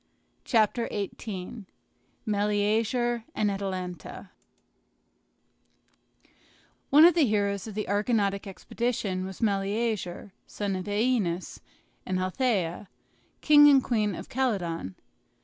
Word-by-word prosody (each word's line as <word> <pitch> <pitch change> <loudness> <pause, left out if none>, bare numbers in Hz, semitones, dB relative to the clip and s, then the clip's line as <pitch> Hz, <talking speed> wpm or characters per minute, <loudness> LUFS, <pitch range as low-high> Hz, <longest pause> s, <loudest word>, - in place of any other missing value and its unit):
CHAPTER 230 0 +2
XVIII 200 0 -6 0.6
MELEAGER 215 +3 0
AND 210 -1 +1
ATALANTA 185 -3 -6 2.6
One 300 +4 +8
of 345 - +7
the 315 -5 +3
heroes 200 -1 0
of 215 - -8
the 215 - -3
Argonautic 205 -1 0
expedition 195 -2 -3
was 190 +3 -7
Meleager, 200 -2 -1
son 200 -2 -3
of 185 -1 -4
OEneus 205 -4 -1 0.4
and 185 0 -2
Althea, 185 -2 -1 0.5
king 295 -1 +7
and 270 -2 +5
queen 210 -5 0
of - - -8
Calydon. 180 - -2
205 Hz, 95 wpm, -27 LUFS, 190-235 Hz, 2.6 s, One